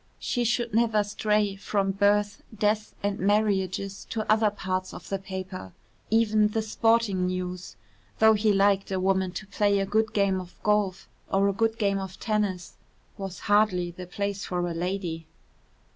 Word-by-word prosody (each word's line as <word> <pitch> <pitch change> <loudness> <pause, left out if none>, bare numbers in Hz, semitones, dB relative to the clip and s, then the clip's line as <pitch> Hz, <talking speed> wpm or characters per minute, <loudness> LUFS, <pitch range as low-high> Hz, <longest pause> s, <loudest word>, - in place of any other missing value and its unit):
She 245 - -1
should 235 0 0
never 225 -2 +3
stray 210 -1 0
from 195 0 -1
birth, 205 +1 +2 0.2
deaths 210 +1 0
and 200 0 -1
marriages 195 -1 0
to 220 -2 -3
other 215 0 +4
parts 185 -2 -3
of - - -10
the 195 - -1
paper. 185 - -7 0.4
Even 215 -1 +3
the 220 +1 -2
sporting 220 -4 +2
news 180 0 -4 0.4
(though 220 0 +6
he 215 0 +2
liked 195 0 +3
a 190 - 0
woman 190 0 +1
to 210 - -6
play 200 0 +1
a 195 - +1
good 220 +2 +1
game 195 -2 +1
of 180 -1 -13
golf 210 -3 +1 0.2
or 195 +1 +3
a 200 - +1
good 225 +2 0
game 200 -3 +1
of 190 -1 -7
tennis) 205 -5 -2 0.4
was 195 -2 -6
hardly 205 -4 +2
the 180 +1 -9
place 200 +2 -3
for 175 -1 -2
a 170 - -3
lady. 170 -2 -3
200 Hz, 165 wpm, -27 LUFS, 190-210 Hz, 0.4 s, though